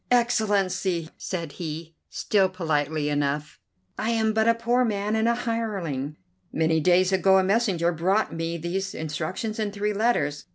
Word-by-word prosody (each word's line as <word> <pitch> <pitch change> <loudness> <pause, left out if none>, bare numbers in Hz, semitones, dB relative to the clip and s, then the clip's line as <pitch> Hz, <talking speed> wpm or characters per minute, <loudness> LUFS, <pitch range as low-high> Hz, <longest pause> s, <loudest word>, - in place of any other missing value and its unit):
"Excellency!" 195 -8 +1
said 170 -5 -5
he, 160 +1 -6 0.2
still 195 -3 +1
politely 155 -4 -1
enough, 145 0 -1 0.4
"I 220 - -1
am 220 -1 +1
but 220 +1 +2
a 230 - +5
poor 240 +2 +1
man 210 -2 -1
and 220 +1 +2
a 235 - +3
hireling. 200 - -3 0.4
Many 160 0 +2
days 180 +3 +3
ago 190 0 +4
a 190 - +4
messenger 190 -4 +2
brought 185 +6 +1
me 165 +1 -3
these 190 +4 -3
instructions 170 +8 -4
and 210 -2 -1
three 210 +1 -1
letters. 210 -9 0
190 Hz, 155 wpm, -25 LUFS, 160-220 Hz, 0.4 s, a